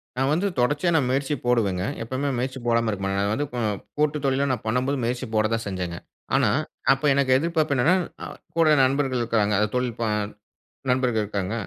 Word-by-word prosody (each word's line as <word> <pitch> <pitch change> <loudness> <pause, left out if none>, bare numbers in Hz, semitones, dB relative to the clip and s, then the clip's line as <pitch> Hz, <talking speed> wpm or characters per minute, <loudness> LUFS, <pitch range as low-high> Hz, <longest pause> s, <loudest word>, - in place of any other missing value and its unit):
நான் 135 +2 +1
வந்து 190 +5 +1
தொடர்ச்சியா 145 +7 +2
நான் 135 -5 +2
முயற்சி 135 +2 0
போடுவேங்க. 100 -7 +1 0.2
எப்வுமே 130 +5 -2
முயற்சி 130 +1 -3
போடாம 115 -1 +2
இருக்க 100 -2 -5
மாட்டேன். 95 0 -1
அது 100 +1 0
வந்து 145 +4 -1
கோ 125 - -2 0.4
கூட்டு 150 0 +1
தொழில்ல 135 +1 +1
நான் 125 -4 -2
பண்ணும்போது 125 +5 0
முயற்சி 125 +2 -1
போட 110 0 +3
தான் 115 0 -1
செஞ்சேங்க. 90 -3 -4 0.4
ஆனா - - +3 0.4
அப்ப 135 - -6
எனக்கு 135 -2 +2
எதிர்பார்ப்பு 155 -1 0
என்னன்னா, 145 +9 +4 0.3
அ - - -4 0.3
கூட 165 -2 +4
நண்பர்கள் 135 -1 +1
இருக்கறாங்க. 110 -3 +1
அது 105 - +2
தொழில் 125 -2 -1
ப - - 0 0.9
நண்பர்கள் 125 -4 +2
இருக்காங்க. 100 0 -3
125 Hz, 185 wpm, -24 LUFS, 110-140 Hz, 0.9 s, என்னன்னா